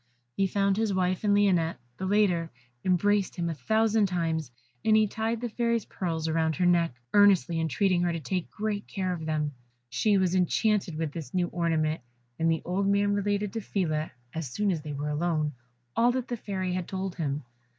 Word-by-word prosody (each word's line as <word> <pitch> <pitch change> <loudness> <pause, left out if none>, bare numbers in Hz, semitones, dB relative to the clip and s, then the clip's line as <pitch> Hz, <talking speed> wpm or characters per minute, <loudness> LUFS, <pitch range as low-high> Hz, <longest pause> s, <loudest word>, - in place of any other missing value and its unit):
He 195 - +2
found 195 +1 +1
his 215 -3 +1
wife 185 0 0
and 205 - +3
Lionette; 180 -5 +3 0.2
the 190 - -3
latter 185 -5 +2 0.3
embraced 195 +2 +2
him 170 -2 -1
a - - -2
thousand 220 - +2
times, 165 -5 -1 0.3
and 220 -1 +5
he 215 - +5
tied 225 +2 -2
the 245 - -1
Fairy's 235 -1 0
pearls 165 -3 -3
round 160 -1 +1
her 180 - +1
neck, 170 -6 +3 0.2
earnestly 190 -6 +5
entreating 175 +3 +1
her 175 -1 +1
to 165 - -2
take 180 +4 -3
great 210 -1 -3
care 185 -2 -2
of 160 -2 -5
them. 150 -2 -1 0.4
She 205 - +3
was 185 -2 +2
enchanted 190 0 +1
with 160 -2 -2
this 165 +3 -7
new 175 -1 +1
ornament, 160 -3 0 0.4
and 165 0 +3
the 160 - -1
old 195 +3 0
man 200 0 +3
related 205 0 0
to 225 - -2
Phila, 160 -7 -1 0.2
as 160 -4 -4
soon 205 +10 0
as 165 -4 -2
they 150 -1 -6
were 145 +1 -3
alone, 155 -1 0 0.4
all 240 +1 +4
that 255 0 -3
the 240 - -1
Fairy 190 -4 -3
had 180 -1 -2
told 190 -1 -4
him. 145 -3 -2
185 Hz, 195 wpm, -28 LUFS, 165-205 Hz, 0.4 s, and